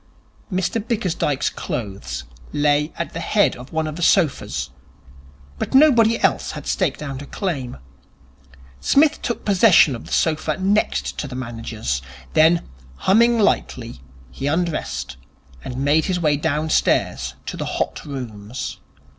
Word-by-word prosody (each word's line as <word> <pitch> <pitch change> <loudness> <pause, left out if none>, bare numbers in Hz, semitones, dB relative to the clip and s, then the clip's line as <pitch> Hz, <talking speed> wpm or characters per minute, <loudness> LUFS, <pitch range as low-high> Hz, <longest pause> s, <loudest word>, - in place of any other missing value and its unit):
Mr 190 +4 0
Bickersdyke's 180 - -1
clothes 100 -4 -5 0.3
lay 145 +1 +2
at 170 - -4
the 165 - -4
head 205 +5 +2
of 125 +2 -11
one 160 0 0
of 155 0 -5
the - - -6
sofas, 140 - +1 0.9
but - - -2
nobody 235 -6 +6
else - - +1
had - - -7
staked - - -1
out 135 -2 -5
a 145 - -9
claim. 140 - -3 1.0
Psmith 300 - +3
took 235 - -3
possession 190 - +5
of 115 - -9
the - - -11
sofa 155 -1 +1
next 195 +3 0
to 145 - -3
the 130 - -7
manager's. 115 - -4 0.3
Then, 165 +2 +4 0.3
humming 230 - +4
lightly, 120 - 0 0.3
he 135 - -4
undressed, 145 - -2 0.5
and 125 - -6
made 145 +4 +2
his 185 -2 0
way 150 -3 +2
downstairs 155 +1 0
to - - -5
the - - -4
Hot - - -2
Rooms. 120 -4 -6
155 Hz, 140 wpm, -21 LUFS, 125-190 Hz, 1.0 s, nobody